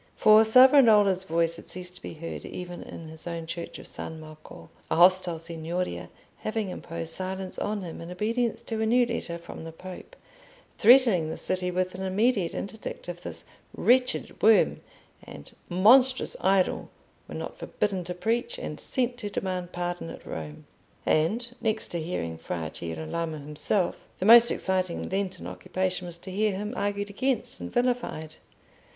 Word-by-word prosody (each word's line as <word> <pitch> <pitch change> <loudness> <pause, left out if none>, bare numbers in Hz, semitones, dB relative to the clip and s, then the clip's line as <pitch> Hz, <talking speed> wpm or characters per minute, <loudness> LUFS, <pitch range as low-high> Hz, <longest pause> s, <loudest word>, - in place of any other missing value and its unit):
For 215 +1 +7
Savonarola's 220 -6 +6
voice 165 -1 +1
had - - -11
ceased 180 0 -6
to - - -15
be - - -7
heard 165 +2 -6
even 175 -1 -7
in 165 - -9
his 160 +2 -6
own 170 -1 -4
church 170 +1 -6
of - - -11
San 160 0 -6
Marco, 155 - -13 0.2
a - - +1
hostile 180 0 +5
Signoria 165 +2 -4 0.3
having 215 -3 -2
imposed 165 -2 -5
silence 190 +1 -4
on 205 -1 -2
him 165 -2 -7
in 165 - -8
obedience 230 +5 -1
to 225 -1 -3
a 220 - +1
new 245 +2 +4
letter 235 -8 -3
from 170 -1 -10
the 165 - -7
Pope, 185 - -10 0.6
threatening 225 -9 +6
the - - -4
city 185 -1 -1
with 185 0 -1
an 185 - -7
immediate 195 -1 +1
interdict 200 -3 -6
if 175 0 -6
this - - -5 0.3
"wretched 250 +1 +2
worm" 220 0 +5 0.4
and - - -11 0.2
"monstrous 250 +8 +5
idol" 190 -1 +2 0.4
were - - -8
not - - -6
forbidden 195 -3 -2
to 180 0 -5
preach, 235 - -1
and - - -6
sent 250 -2 -1
to 210 -4 -4
demand 185 -3 -3
pardon 175 -1 -4
at - - -10
Rome. 75 -2 -7 0.4
And 210 +10 +2
next 220 -1 0
to 170 - -3
hearing 85 - -4
Fra 80 -1 -4
Girolamo 85 - -4
himself, 150 +6 -1
the 185 - -2
most 235 +2 +9
exciting 185 -2 -1
Lenten 190 -1 -3
occupation 185 -1 -3
was 170 -1 -6
to 185 +2 -9
hear 210 +2 +1
him 210 +3 -4
argued 205 -1 -2
against 255 +2 -1
and - - -6
vilified. 245 -11 -1
185 Hz, 165 wpm, -27 LUFS, 170-220 Hz, 0.6 s, most